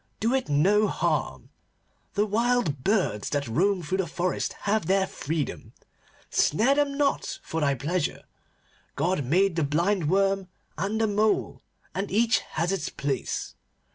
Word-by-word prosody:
Do 230 +4 +1
it 265 - 0
no 195 +9 +4
harm. - - -1 0.6
The 205 0 +3
wild 215 - +1
birds 185 - +1
that 145 -2 -1
roam 185 - +1
through 185 +5 -2
the 190 - 0
forest 175 +3 -2
have 205 -4 0
their 195 0 +3
freedom. 155 -4 -4 0.6
Snare 225 - +3
them 280 -1 0
not 285 -1 0
for 165 - -3
thy 140 -2 +2
pleasure. 155 +5 -2 0.7
God 175 -4 0
made 175 +7 +2
the 165 - +2
blind 170 +3 +1
worm 195 0 +2 0.3
and 210 +3 -2
the 225 - +3
mole, 210 0 +1 0.3
and 195 +1 -3
each 225 +3 +3
has 170 +3 -2
its 195 -3 -2
place. 140 -1 -3
190 Hz, 145 wpm, -26 LUFS, 155-215 Hz, 0.7 s, no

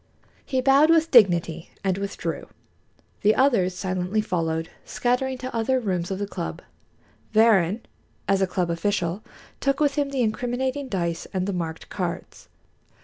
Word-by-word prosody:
He 260 -2 -1
bowed 275 +4 +5
with 330 0 +4
dignity 170 - +4
and 190 -1 0
withdrew. 200 0 -4 0.7
The 215 +1 +4
others 225 -10 +3
silently 185 +2 -1
followed, 165 -5 -1
scattering 255 +2 -1
to 255 -1 -6
other 255 +3 +1
rooms 185 -6 -2
of 190 - -2
the 205 - -2
club. 80 - -6 0.7
Varrin, 215 -2 +4 0.5
as 195 0 +2
a 190 - +3
club 180 -2 -1
official, 180 +1 -1 0.4
took 275 0 0
with 290 -2 +1
him 285 -1 +1
the 270 -3 0
incriminating 250 +5 -2
dice 170 -5 -2
and 185 -1 0
the 200 - -2
marked 165 -2 -5
cards. - - -5
205 Hz, 145 wpm, -24 LUFS, 180-255 Hz, 0.7 s, bowed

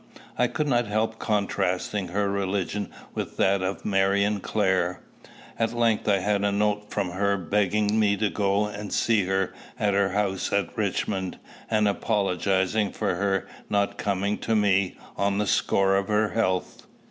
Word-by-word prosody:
I - - +2
could 150 - -2
not 120 -4 +2
help 110 +2 -1
contrasting 100 -2 -1
her 100 +3 0
religion 100 +1 -2 0.2
with - - -5
that 95 0 +3
of 95 +1 -3
Marion 100 +1 +2
Clare. 95 -3 0 0.6
At 115 0 +1
length 115 -3 +1
I 100 - +4
had 100 +1 0
a 100 - +2
note 105 +1 0
from 100 -4 -2
her, 100 +2 +1
begging 105 +3 +1
me 100 -1 +3
to 105 -1 0
go 100 0 +1
and 105 -1 -6
see 110 -4 +2
her 95 0 0 0.2
at 105 -1 +1
her 100 0 +2
house 95 -1 -1
at 100 -4 0
Richmond, 95 -2 -2 0.3
and 110 -2 +3
apologizing 100 0 +1
for 105 -3 -1
her 95 +1 0 0.2
not 100 -1 0
coming 100 0 -1
to 115 - 0
me, 100 -3 +2 0.2
on 100 0 +1
the 105 - +1
score 95 +2 +2
of 100 0 0
her 105 0 +2
health. 95 -5 -1
100 Hz, 160 wpm, -26 LUFS, 95-105 Hz, 0.6 s, I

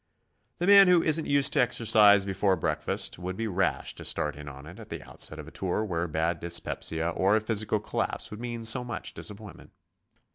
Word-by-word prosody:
The 175 - -2
man 200 0 +8
who 180 -2 +4
isn't 160 0 +1
used 140 -1 +3
to 145 - +3
exercise 105 -4 +4
before 95 0 +1
breakfast, 85 - -2
would 90 +1 -5
be 115 0 -2
rash 95 -2 -1
to - - -11
start 75 -1 0
in 75 0 -9
on 70 +1 -12
it 85 +3 -12
at - - -12
the - - -7
outset 80 - -2
of 75 -1 -9
a - - -11
tour 95 +3 -2
where 85 -3 -2
bad 80 +1 -1
dyspepsia 85 -1 -2
or 95 +4 +1
a - - +3
physical 110 -1 0
collapse - - -4
would 105 +2 -8
mean 120 -1 -5
so 115 +2 +2
much 120 -2 -6
disappointment. 105 -3 -9
100 Hz, 205 wpm, -27 LUFS, 85-115 Hz, -, man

